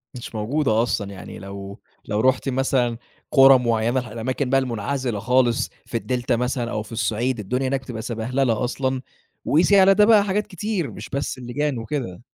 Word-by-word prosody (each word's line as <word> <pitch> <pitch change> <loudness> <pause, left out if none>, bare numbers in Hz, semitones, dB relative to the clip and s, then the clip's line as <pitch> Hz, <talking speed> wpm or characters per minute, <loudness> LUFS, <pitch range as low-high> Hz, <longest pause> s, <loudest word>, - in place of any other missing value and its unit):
مش 120 -2 -8
موجودة 115 0 +1
أصلًا، 100 -4 -2
يعني 95 - -9
لو 100 +1 -8 0.3
لو 105 0 -1
رُحتِ 130 +2 +2
مثلًا 125 -3 +1 0.3
قُرى 135 -1 +8
معيّنة، 115 0 0
الأماكن 125 +3 -2
بقى 135 0 +4
المنعزِلة 125 -1 -2
خالص 120 +1 +2 0.2
في 115 - -3
الدلتا 125 0 -1
مثلًا 125 0 -2
أو 105 - -2
في 110 - -15
الصِّعيد، 115 +2 -1
الدنيا 125 +6 -1
هناك 135 0 -1
بتبقى 120 -4 -6
سَبَهللة 120 +1 -1
أصلًا، 130 +1 -1 0.4
وقيسي 180 +6 +4
على 195 +1 +7
ده 210 +1 +5
بقى 215 -2 +6
حاجات 205 +2 -1
كتير، 195 -4 -3
مش - - -9
بس 140 -1 -3
اللِّجان 130 +2 -2
وكده. 115 -6 -4
125 Hz, 170 wpm, -22 LUFS, 115-135 Hz, 0.4 s, قُرى